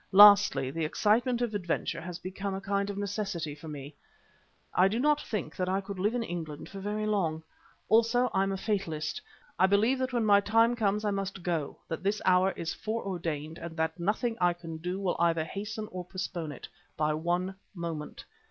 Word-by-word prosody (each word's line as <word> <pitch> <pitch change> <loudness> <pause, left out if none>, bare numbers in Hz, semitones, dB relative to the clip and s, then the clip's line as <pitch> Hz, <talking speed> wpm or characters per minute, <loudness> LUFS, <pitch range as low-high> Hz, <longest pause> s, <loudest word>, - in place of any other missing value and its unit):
Lastly, 200 -10 +8
the 165 +2 -2
excitement 235 - +2
of 235 -3 -2
adventure 170 -3 -2
has 175 0 -6
become 190 +2 -4
a - - -3
kind 200 0 -1
of 200 - -4
necessity 200 -6 -3
for 150 +2 -11
me. 145 -1 -7 0.8
I 185 - +5
do 215 +4 -1
not 295 +2 +3
think 175 -8 -4
that 185 0 -1
I 190 +1 +1
could 200 -1 -7
live 210 +5 +1
in 240 - 0
England 160 -6 -6
for 195 - -8
very 210 +2 -2
long. 170 -7 0 0.4
Also 230 +3 +4
I'm 195 0 +2
a 195 - -2
fatalist. 170 -8 -2 0.4
I 190 - +6
believe 220 +7 +3
that 260 0 -1
when 240 -3 +1
my 205 -1 +7
time 225 +4 +4
comes 210 -2 0
I 205 - +2
must 195 -2 -3
go, 165 -5 -2
that 165 - -4
this 200 +3 0
hour 185 +1 +5
is 165 - -3
foreordained 170 -8 -3
and 165 0 -7
that 160 +2 -1
nothing 220 +6 0
I 175 0 +4
can 165 -2 -8
do 180 +4 -3
will 190 -3 0
either 165 -2 +3
hasten 215 +5 -5
or 180 0 -5
postpone 175 -3 -4
it 140 - -9 0.3
by 155 0 +2
one 175 +4 -1 0.2
moment. 165 -3 -5
190 Hz, 195 wpm, -30 LUFS, 165-210 Hz, 0.8 s, Lastly